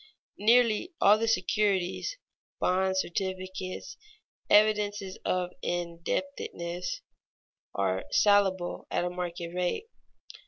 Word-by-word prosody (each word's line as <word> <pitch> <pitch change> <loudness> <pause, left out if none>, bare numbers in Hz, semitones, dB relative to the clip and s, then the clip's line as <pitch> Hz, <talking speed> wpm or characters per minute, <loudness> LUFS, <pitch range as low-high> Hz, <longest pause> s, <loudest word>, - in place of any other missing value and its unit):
Nearly 235 - +3
all 210 +2 +6
the 230 - 0
securities 210 - +1 0.4
(bonds, 190 +1 +2
certificates, 185 0 -4 0.5
evidences 205 -2 +3
of 180 -1 0
indebtedness) 175 - -3 0.7
are 95 -1 0
salable 195 -3 +2
at 175 - 0
a 180 - -2
market 175 -1 -5
rate. 180 - -1
190 Hz, 85 wpm, -29 LUFS, 175-210 Hz, 0.7 s, all